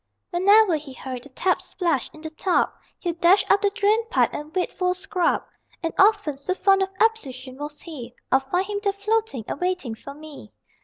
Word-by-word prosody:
Whenever 385 0 +5
he 290 -3 -9
heard 255 -1 -6
the 285 - -11
tap 365 +7 0
splash 335 -9 -1
in 310 - -14
the 315 0 -6
tub 355 +3 +1 0.3
He'd 340 -1 -4
dash 360 +4 +5
up 400 - +5
the 405 - +3
drain 415 +3 +2
pipe 480 - +3
and 295 +1 -6
wait 365 - 0
for 360 0 +1
a - - -12
scrub, 365 -2 0 0.4
And 330 - -1
often, 400 -8 +4
so 280 +7 -2
fond 390 0 +4
of 385 - +1
ablution 270 - 0
was 295 0 -6
he, 250 -8 -9 0.2
I'd 265 - +5
find 355 +8 -1
him 410 0 -3
there 400 -1 +1
floating 415 - -1
and - - -4
waiting 360 -10 -1
for 280 +5 -10
me. 305 -1 -11
355 Hz, 205 wpm, -24 LUFS, 285-395 Hz, 0.4 s, Whenever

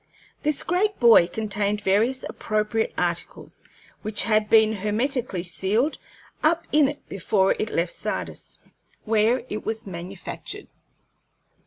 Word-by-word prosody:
This 300 -1 0
great 405 +4 0
buoy 230 -8 +7
contained 205 +1 -2
various 220 +7 +2
appropriate 215 +1 -1
articles, - - -3 0.4
which 215 -1 -1
had 215 -1 +2
been 220 -1 +5
hermetically 215 -1 -1
sealed 200 - 0 0.4
up 335 +2 +2
in 300 -2 +5
it 290 +1 -7
before 195 0 +1
it 215 - -1
left 170 -2 0
Sardis, - - -5 0.5
where 225 +3 +2
it 215 -3 -5
was 220 0 -3
manufactured. 180 0 -7
215 Hz, 120 wpm, -24 LUFS, 200-250 Hz, 0.5 s, buoy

